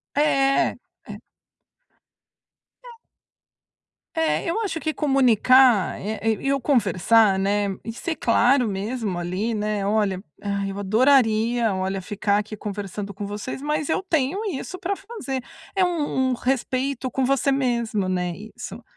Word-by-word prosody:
É. 275 -2 +3
É. - - -13 2.1
É. - - -11 1.2
É, 320 +1 0
eu 360 - -1
acho 405 -7 -2
que 310 +2 -1
comunicar, 255 -5 +4
é, 215 +2 -4
e 225 +4 0
e 275 - +3
o 275 - 0
conversar, 220 - +3
né, 200 +1 +1 0.2
e 225 - -5
ser 320 +7 -4
claro 245 +2 +3
mesmo 205 0 -3
ali, 185 +6 -2
né, 210 -1 -1
"Olha, 205 -3 +1 0.2
ai, 200 -1 -2
eu 195 - -6
adoraria, 225 0 +3
olha, 190 +1 -2
ficar 205 +2 0
aqui 215 +1 -6
conversando 205 0 -5
com 200 +1 -6
vocês, 205 +6 -5
mas 300 0 -1
eu 330 - 0
tenho 325 +2 0
isso 335 +6 -6
pra 380 +2 -3
fazer". 395 - -5 0.3
É 380 -2 +3
um 290 -7 0
um - - +1
respeito 260 +1 -1
com 265 +2 -1
você 275 +1 +2
mesmo, 235 -7 0
né, 180 -1 -1
isso. 235 +4 -9
235 Hz, 140 wpm, -23 LUFS, 205-275 Hz, 2.1 s, comunicar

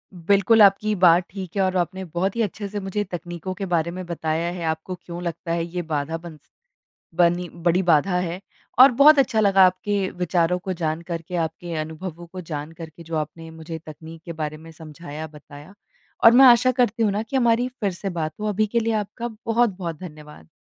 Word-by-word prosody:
बिल्कुल, 200 +6 +3
आपकी 205 +2 +5
बात 175 -1 +5
ठीक 190 -2 -8
है 195 - +1
और 185 0 +1
आपने 185 +2 -2
बहुत 180 +5 -2
ही 230 - 0
अच्छे 205 -1 -3
से 205 +1 -5
मुझे 195 +1 -3
तकनीकों 175 -1 -6
के 195 +1 -5
बारे 170 0 +1
में 185 +1 -6
बताया 165 0 -2
है। 175 -1 -6
आपको 160 +3 -3
क्यों 175 -1 -9
लगता 170 0 -4
है 170 0 -1
ये 175 +1 -4
बाधा 150 +1 -2
बन 165 -2 -11
स - - -34 0.7
बनी 175 0 +2
बड़ी 175 +2 +1
बाधा 175 +1 +3
है 180 +1 -4 0.4
और 260 +2 +9
बहुत 300 +1 +8
अच्छा 230 -5 +3
लगा 195 -2 +5
आपके 190 +1 -1
विचारों 180 0 +1
को 190 +1 -4
जान 160 -2 -2
करके, 170 +1 -6
आपके 165 +1 -3
अनुभवों 165 +2 -7
को 185 +2 -9
जान 155 -2 -6
करके, 165 0 -11
जो 165 0 -5
आपने 160 +2 -5
मुझे 160 0 -8
तकनीक 160 +1 -11
के 170 - -6
बारे 155 -1 -4
में 160 +1 -13
समझाया, 155 -1 -9
बताया। 150 +3 -14 0.5
और 230 - +9
मैं 260 +3 +7
आशा 245 +1 +6
करती 240 -3 +1
हूँ 210 - +3
ना 210 - -1
कि 225 +5 -4
हमारी 240 0 +2
फ़िर 245 -6 -3
से 195 +2 -5
बात 160 -3 -3
हो। 215 - -2
अभी 215 +1 +1
के 235 +3 0
लिए 225 0 0
आपका 215 +3 -3 0.2
बहुत-बहुत 195 -9 0
धन्यवाद। 150 - -11
175 Hz, 205 wpm, -23 LUFS, 165-200 Hz, 0.7 s, और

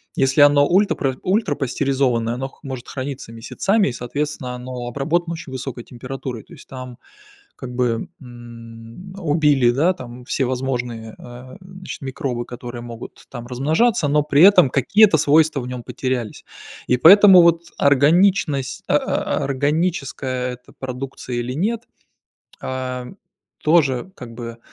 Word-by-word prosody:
Если 135 +2 +2
оно 145 0 +6
ультрапра 175 -8 +1
ультрапастеризованное, 135 - 0
оно 130 +2 -4
х - - -25
может 130 -3 -7
храниться 135 -3 -6
месяцами 190 - 0
и - - -4
соответственно 130 +1 -4
оно 125 0 -7
обработано 165 +7 -1
очень 160 -4 -8
высокой 130 -2 -6
температурой. 125 -2 -7
То - - -17
есть, - - -15
там, 130 -2 -9 0.6
как 125 -2 -8
бы, 120 -2 -1
м. 120 +6 -12
Убили, 150 -7 +3
да, 160 +9 +2
там 125 -7 -10
все 135 +1 -1
возможные, 125 -3 -4
э, 125 +6 -12
значит, 185 -1 -10
микробы, 130 -3 -4
которые 120 0 -8
могут 120 -1 -10
там 120 -2 -8
размножаться, 155 - +1
но 150 +1 +2
при 150 0 +2
этом 185 -7 +7
какие-то 195 - +4
свойства 150 0 +3
в 125 - -7
нём 125 -1 -6
потерялись. 125 -4 -4 0.4
И 125 - +3
поэтому 190 +4 +8
вот, 170 0 +3
органичность, 145 0 +2
а - - +4
а - - -2
органическое 140 -3 -1
это 125 0 -15
продукция 130 -1 -6
или 120 +1 -3
нет, 215 - -1 0.8
а, 130 -1 -4 0.6
тоже 155 0 +2
как 115 -2 -10
бы, 115 -1 -8
130 Hz, 140 wpm, -20 LUFS, 125-155 Hz, 0.8 s, поэтому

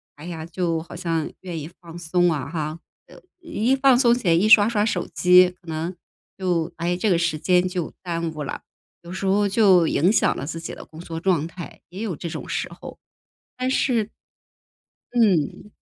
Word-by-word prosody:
哎 150 - -12
呀， 165 -2 -6
就 170 -1 -1
好 170 - -11
像 165 -3 -2
愿 175 -3 -6
意 150 - -7
放 170 -1 -10
松 175 +1 +1
啊 145 -2 -3
哈。 155 -1 -4 0.3
呃， - - -16 0.2
一 270 -7 0
放 265 -2 +5
松 240 -2 +5
起 240 -7 -4
来， 165 - +5
一 195 +6 +3
刷 210 -1 +8
刷 210 -3 +1
手 195 -5 -1
机， 180 0 +6
可 175 - -24
能 165 +3 -4 0.4
就 175 -3 -1
哎， 175 +1 -1
这 215 - -1
个 175 - +3
时 165 -2 0
间 180 +3 +2
就 180 -3 -4
耽 170 -2 -2
误 155 - -7
了。 - - -5 0.4
有 170 - -10
时 190 +1 -4
候 200 +2 +3
就 190 -6 +5
影 175 +7 +2
响 - - +2
了 135 - -4
自 165 +2 -5
己 165 - -7
的 - - -11
工 160 - -14
作 165 -1 -6
状 165 -3 +1
态， 170 0 -10
也 190 +5 -7
有 195 -8 -3
这 170 - -6
种 - - -7
时 - - -2
候。 - - -11 0.6
但 255 0 -2
是 245 -4 +1 1.1
嗯。 210 - +1
175 Hz, 215 characters per minute, -23 LUFS, 165-205 Hz, 1.1 s, 刷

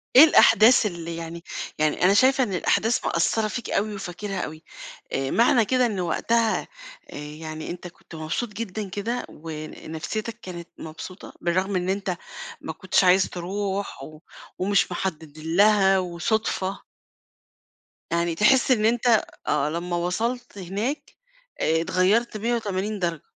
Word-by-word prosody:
إيه 265 - +12
الأحداث 240 -6 +6
اللي 170 -4 -4
يعني 170 0 -7 0.4
يعني 155 +2 +1
أنا 190 +2 +6
شايفة 260 +5 +4
إن 205 -6 -3
الأحداث 220 +5 +1
مأثّرة 215 +6 +1
فيك 240 +3 -5
أوي 210 +1 0
وفاكرها 195 0 -5
أوي، 155 0 -7 0.5
آآ 135 0 -1
معنى 230 -1 +4
كده 255 +2 +2
إنه 205 -6 -1
وقتها 225 +5 +1 0.5
آآ - - -10
يعني 155 +1 -7
أنت 180 +1 -7
كنت 175 -1 -14
مبسوط 160 +9 -3
جدًا 210 -1 -5
كده 220 +6 -3
ونفسيّتك 160 +7 -6
كانت 175 -2 -8
مبسوطة، 160 +4 -9
بالرغم 185 +3 0
إن 180 0 -1
أنت 190 -2 -1 0.4
ما 160 - -5
كنتش 185 +3 +1
عايز 185 +1 +5
تروح 195 +2 -4
و 155 -1 -11 0.4
ومش 200 +2 +2
محدِّد 160 -5 -4
لها 195 +4 +4
وصدفة. 185 +2 -2 1.3
يعني 170 0 0
تحِس 250 +8 +4
إن 215 -4 +3
أنت 235 0 +3 0.2
آه. 145 - +1
لمّا 175 +2 -3
وصلت 225 +8 -2
هناك، 200 - -4 0.4
اتغيّرت 185 +8 +2
مِيَّة 235 +3 0
وتمانين 205 -1 -2
درجة. 170 -4 -2
190 Hz, 135 wpm, -24 LUFS, 170-215 Hz, 1.3 s, إيه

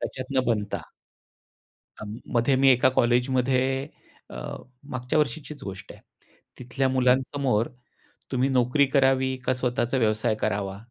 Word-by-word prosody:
त्याच्यातनं 130 0 -2
बनता. 105 -3 -1 1.2
अं, 105 +2 -7 0.2
मध्ये 120 +4 +3
मी 135 0 +5
एका 125 +1 +4
कॉलेजमध्ये 130 +2 +1 0.4
अ, - - -9 0.6
मागच्या 125 +4 -1
वर्षीचीच 150 +1 -2
गोष्ट 95 -1 -8
आहे. - - -16 0.6
तिथल्या 130 +2 -1
मुलांसमोर 130 -2 +1 0.6
तुम्ही 130 +1 +1
नोकरी 130 +2 +3
करावी 130 -1 +3
का 130 - +2
स्वतःचा 125 0 -1
व्यवसाय 110 -2 +1
करावा? 100 -2 -2
130 Hz, 115 wpm, -25 LUFS, 120-135 Hz, 1.2 s, मी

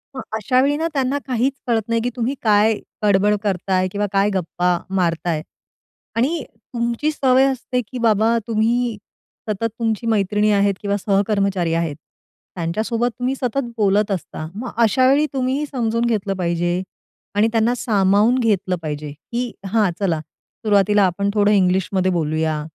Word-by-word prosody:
मग 260 - -4 0.2
अशावेळी 255 +7 +2
ना 325 +2 0
त्यांना 270 0 0
काहीच 255 +1 +1
कळत 230 -2 +2
नाही, 230 0 +1
की 245 - -1
तुम्ही 250 +3 -1
काय 215 0 +4 0.3
बड-बड 205 0 +3
करताय 185 -1 0
किंवा 205 +1 -1
काय 195 +1 +3
गप्पा 180 -1 0 0.2
मारताय. 170 -3 0 0.7
आणि 275 +7 0 0.3
तुमची 235 +5 0
सवय 265 -3 +3
असते, 250 -1 -2
की 235 +2 -9
बाबा, 225 0 +3
तुम्ही 230 +1 +1 0.5
सतत 215 +2 0
तुमची 225 0 -1
मैत्रिणी 210 -1 +2
आहेत 200 -1 +3
किंवा 200 0 0
सहकर्मचारी 195 -3 +1
आहेत, 165 -3 -1 0.6
त्यांच्यासोबत 220 +8 -1
तुम्ही 255 +2 0
सतत 250 -1 -2
बोलत 205 0 +2
असता. 170 -4 -4
मग 240 +4 -5
अशावेळी 260 +7 +4
तुम्हीही 265 +2 0
समजून 230 -3 0
घेतलं 210 -4 0
पाहिजे. 175 0 0 0.5
आणि 210 +2 +4
त्यांना 225 +1 +2
सामावून 210 +3 +3
घेतलं 200 -6 +1
पाहिजे, 150 -1 -5
की 235 +11 -5 0.2
"हां 215 -4 +3
चला, 175 -6 0
सुरुवातीला 205 +5 0
आपण 200 +2 0
थोडं 205 -1 +3
इंग्लिश 190 -2 +3
मध्ये 185 -1 +2
बोलूया." 155 -2 0
210 Hz, 145 wpm, -20 LUFS, 190-235 Hz, 0.7 s, काय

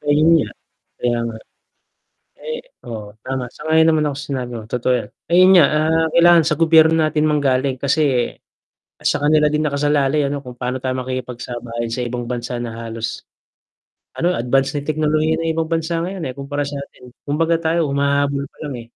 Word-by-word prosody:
Ayun 150 +2 +3
nga, - - -3 0.5
kaya 120 -1 +1
nga. 110 - -7 1.1
Ay 475 0 -4 0.3
oo 105 -2 -7
tama, 130 -1 -3
sang-ayon 160 +1 +2
naman 155 -1 +3
ako 135 - -6
sinabi 130 -4 -4
mo 110 - -9
totoo 125 +2 0
yan. - - -6 0.2
Ayun 185 +2 +6
nga, 175 -5 +8
ah, 160 +1 +2
kailangan 170 0 +6
sa 155 - -1
gobyerno 160 -1 +5
natin 155 0 +2
manggaling 135 -3 +1
kasi, 140 -3 +1 0.6
sa - - 0
kanila 150 0 +3
din 150 - +1
nakasalalay 145 0 +1
ano 140 +1 -2
kung 125 -3 -10
paano 125 +1 -3
tayo 130 0 -2
makikipagsabayan 120 -2 -5
sa 125 - -2
ibang 120 0 -4
bansa 120 0 -4
na 115 - -5 0.2
halos, 115 0 -5 0.9
ano 175 +2 +1
advance 135 +4 +1
na 145 - -2
teknolohiya 155 +1 +1
ng 165 0 -1
ibang 165 0 -2
bansa 165 0 -1
ngayon 185 -2 -4
eh, 130 - -6
kumpara 140 +1 -3
sa 140 0 -5
atin. 125 -2 -14 0.2
Kumbaga 165 +3 +1
tayo 165 0 0
humahabol 140 0 +1
pa - - -32
lang 140 - -5
eh. - - -14
145 Hz, 175 wpm, -19 LUFS, 125-160 Hz, 1.1 s, nga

